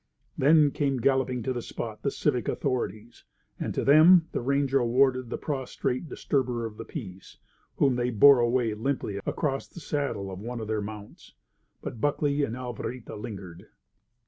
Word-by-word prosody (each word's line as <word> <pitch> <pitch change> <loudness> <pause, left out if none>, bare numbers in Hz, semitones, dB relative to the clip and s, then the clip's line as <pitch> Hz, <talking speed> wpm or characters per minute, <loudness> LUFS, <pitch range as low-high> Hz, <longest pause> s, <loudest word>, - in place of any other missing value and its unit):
Then 150 +1 +5
came 140 -2 0
galloping 130 -1 +1
to 130 - -1
the 120 - -3
spot 110 -2 -6
the 140 - 0
civic 135 -3 -1
authorities; 120 -4 -3 0.4
and - - -2
to - - 0
them 160 +4 +7
the - - -2
ranger 140 +1 +1
awarded 130 0 +2
the - - -3
prostrate 135 +1 -3
disturber 125 -4 -1
of 110 -1 -7
the - - -7
peace, 95 - -9 0.4
whom 135 -3 +2
they 120 0 0
bore 125 +4 +7
away 120 -1 +1
limply 110 -3 -2
across 135 -2 -1
the - - -11
saddle 140 - -3
of 95 - -7
one 120 +3 -5
of 110 - -5
their 110 -1 -1
mounts. 105 0 -10 0.5
But 115 - -6
Buckley 145 0 +1
and 120 -4 -2
Alvarita 125 -1 -6
lingered. 95 -5 -8
125 Hz, 165 wpm, -27 LUFS, 110-140 Hz, 0.5 s, them